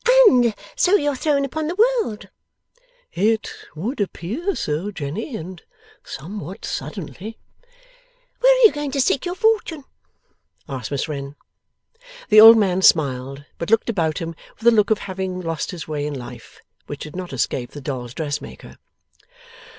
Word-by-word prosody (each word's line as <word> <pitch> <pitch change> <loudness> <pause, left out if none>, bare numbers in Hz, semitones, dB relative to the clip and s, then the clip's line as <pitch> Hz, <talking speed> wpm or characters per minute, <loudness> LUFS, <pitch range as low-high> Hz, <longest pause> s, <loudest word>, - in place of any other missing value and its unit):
'And 240 - +4 0.2
so 370 +3 +4
you're 290 -6 +1
thrown 280 0 +1
upon 310 +3 -3
the 345 - -3
world!' 450 - +1 0.8
'It 215 +4 +1 0.3
would 215 - -3
appear 235 - -3
so, 155 +7 -2
Jenny, 200 - -5
and 175 +1 -9 0.4
somewhat 180 +4 -8
suddenly.' 180 +8 -6 1.0
'Where - - +6
are - - +5
you 435 - +8
going 295 -1 -4
to 280 - -1
seek 270 +4 +1
your 355 - -3
fortune?' 430 -9 +1 0.8
asked 130 -5 -5
Miss 140 -2 -2
Wren. 140 -2 -6 0.9
The 215 -1 +8
old 225 +1 +11
man 190 -3 +2
smiled, 140 -4 +2
but 170 - -4
looked 225 +1 +2
about 165 -7 -1
him 165 0 -4 0.2
with 225 - -12
a 235 - +7
look 210 -1 +3
of 220 - +3
having 190 -2 -4
lost 165 -3 -3
his 175 -4 -7
way 150 -1 -3
in 150 - -4
life, 125 -2 -10 0.3
which 145 - -7
did 150 - -8
not 185 -1 -6
escape 125 -1 -2
the 145 - -9
dolls' 125 -3 -5
dressmaker. 150 -3 -6
190 Hz, 155 wpm, -21 LUFS, -, 1.0 s, old